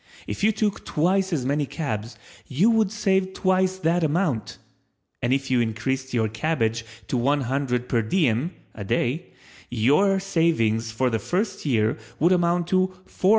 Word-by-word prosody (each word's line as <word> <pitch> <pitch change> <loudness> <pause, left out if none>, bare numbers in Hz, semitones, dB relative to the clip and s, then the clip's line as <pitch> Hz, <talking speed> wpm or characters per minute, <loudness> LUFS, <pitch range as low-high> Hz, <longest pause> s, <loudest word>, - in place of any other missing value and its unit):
If - - -5
you 215 - +5
took 215 -1 -1
twice 190 +5 +1
as 140 -7 -1
many 145 +1 0
cabs 115 -8 -4 0.3
you 180 - +3
would 220 -3 +2
save 190 -3 +1
twice 185 0 +1
that 170 0 +1
amount, 155 - 0 0.6
and 120 - 0
if 135 0 0
you 125 -2 +3
increased 130 +4 -2
your 115 -3 +1
cabbage 115 -1 -1 0.2
to - - -2
one 140 +4 +2
hundred 125 -1 -1
per 115 - +1
diem 130 - +1 0.2
(a 105 - -7
day) 120 - -1 0.4
your 150 - +3
savings 140 - +1
for 125 +2 0
the 115 - 0
first 190 - -2
year 115 -3 +1 0.2
would 170 +4 +3
amount 175 -1 +2
to 185 0 +3 0.2
$448,950. 190 - 0
145 Hz, 160 wpm, -24 LUFS, 120-185 Hz, 0.6 s, you